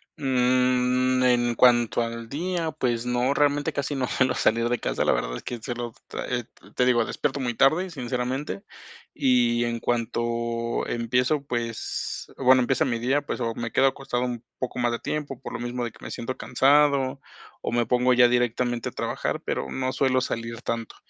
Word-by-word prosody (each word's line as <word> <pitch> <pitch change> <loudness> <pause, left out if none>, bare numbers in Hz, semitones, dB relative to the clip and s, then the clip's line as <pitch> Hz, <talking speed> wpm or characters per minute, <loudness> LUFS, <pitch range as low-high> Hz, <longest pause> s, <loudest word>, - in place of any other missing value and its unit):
Mm, 130 -2 +2
en 120 -1 +3
cuanto 120 -1 +4
al 115 0 -4
día, 165 +4 -2
pues 120 -4 -1
no, 125 +3 +1
realmente 145 0 +2
casi 140 +1 -2
no 130 -2 -1
suelo 130 0 +1
salir 115 +1 +2
de 120 -1 0
casa, - - -1
la - - +4
verdad - - -1
es - - -8
que 120 - -5
solo 120 -1 -5
tra - - -5
eh, 120 -2 -2 0.3
te 125 - +3
digo, 120 -2 +3
despierto - - -2
muy 125 -3 -1
tarde, 160 +10 +3
sinceramente, 125 - -3 0.5
y 120 -2 +3
en 120 0 -2
cuanto 115 0 -1
empiezo, 125 +5 0
pues, 120 -3 -4
bueno, 130 -1 +6
empieza 130 +2 +2
mi 120 -3 0
día, 130 +5 +1
pues, 145 - -5
o 115 -1 -1
me 115 0 -4
quedo - - +3
acostado 135 -2 0
un 120 -2 -3
poco 125 -1 -4
más 120 -1 +2
de 120 - -1
tiempo, 145 -4 -4
por - - -8
lo - - -4
mismo 120 0 -3
de 120 - -3
que - - -18
me - - -6
siento 130 +2 -4
cansado, 140 0 +3 0.4
o - - -3
me 120 0 +1
pongo 125 +2 +2
ya 125 0 +7
directamente 120 0 0
a - - -14
trabajar, - - -2
pero 65 - -2
no 130 0 -1
suelo 130 -1 +2
salir 115 -2 -4
tanto, 115 -1 -3
125 Hz, 190 wpm, -25 LUFS, 120-130 Hz, 0.5 s, ya